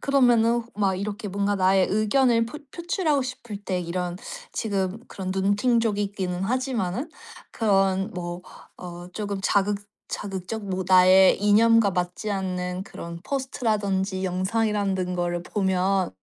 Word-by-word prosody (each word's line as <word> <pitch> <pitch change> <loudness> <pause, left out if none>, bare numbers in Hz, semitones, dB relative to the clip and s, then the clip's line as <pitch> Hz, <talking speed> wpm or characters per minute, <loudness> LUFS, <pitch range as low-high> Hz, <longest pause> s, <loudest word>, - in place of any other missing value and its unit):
그러면은 240 -4 +4
호 235 - -13
막 195 -2 +2
이렇게 205 +1 -4
뭔가 200 +1 0
나의 190 0 +4
의견을 230 +3 +3
포 245 +6 -8
표출하고 340 -4 0
싶을 240 -4 -6
때 190 -3 -2
이런 175 0 -3 0.4
지금 200 -2 -2
그런 185 -1 -5
눈팅족이기는 200 -2 0
하지만은 255 - -1 0.4
그런 195 -2 +2
뭐 175 0 -5 0.3
어 175 0 -9
쪼금 200 -1 -4
자극 200 +1 +2 0.3
자극적 200 +2 -5
뭐 185 -1 -2
나의 185 0 +7
이념과 220 0 +5
맞지 180 +4 -2
않는 185 -2 -2
그런 170 -4 -8
포스트라든지 205 -8 -1
영상이라는 190 0 0
거를 175 0 -1
보면 190 -1 +1
200 Hz, 290 characters per minute, -25 LUFS, 185-225 Hz, 0.4 s, 나의